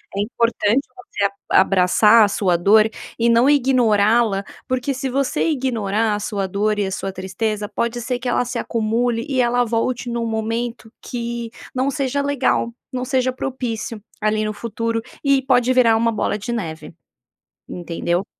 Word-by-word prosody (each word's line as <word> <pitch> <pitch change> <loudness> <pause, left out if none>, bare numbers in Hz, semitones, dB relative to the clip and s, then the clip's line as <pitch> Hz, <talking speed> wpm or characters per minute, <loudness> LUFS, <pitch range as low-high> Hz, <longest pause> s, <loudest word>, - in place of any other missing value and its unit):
É - - -2
importante 230 +2 +1
você 370 - -3 0.3
a - - +7
abraçar 195 +4 +5
a - - +1
sua 185 -3 +1
dor 215 +5 +5 0.3
e 235 +1 +3
não 235 +3 +4
ignorá-la, 230 -6 +3 0.2
porque 255 +2 -1
se 265 +1 -3
você 275 +5 0
ignorar 225 -6 0
a - - -3
sua 205 -1 -2
dor 210 +3 0
e 205 - +1
a 190 - -3
sua 195 0 -3
tristeza, 205 +3 -3
pode 235 +1 -2
ser 245 +1 -2
que 250 - -5
ela 245 - +1
se 245 - -3
acumule 230 +1 -1
e 260 -2 +2
ela 245 0 +2
volte 240 +2 -1
num 235 -1 -2
momento 225 +1 -3
que 235 -1 -4 0.3
não 260 +2 +1
seja 275 0 -1
legal, 280 -4 0 0.2
não 250 0 -2
seja 255 0 +1
propício, 245 -4 -4 0.2
ali 215 0 +1
no 215 - -2
futuro 230 +1 -3 0.2
e 275 -2 +3
pode 250 -1 +2
virar 240 -3 +5
uma 230 +1 +2
bola 215 -1 -1
de 215 +4 -5
neve, 165 -8 -5 0.8
entendeu? 175 +1 -2
230 Hz, 165 wpm, -20 LUFS, 210-250 Hz, 0.8 s, a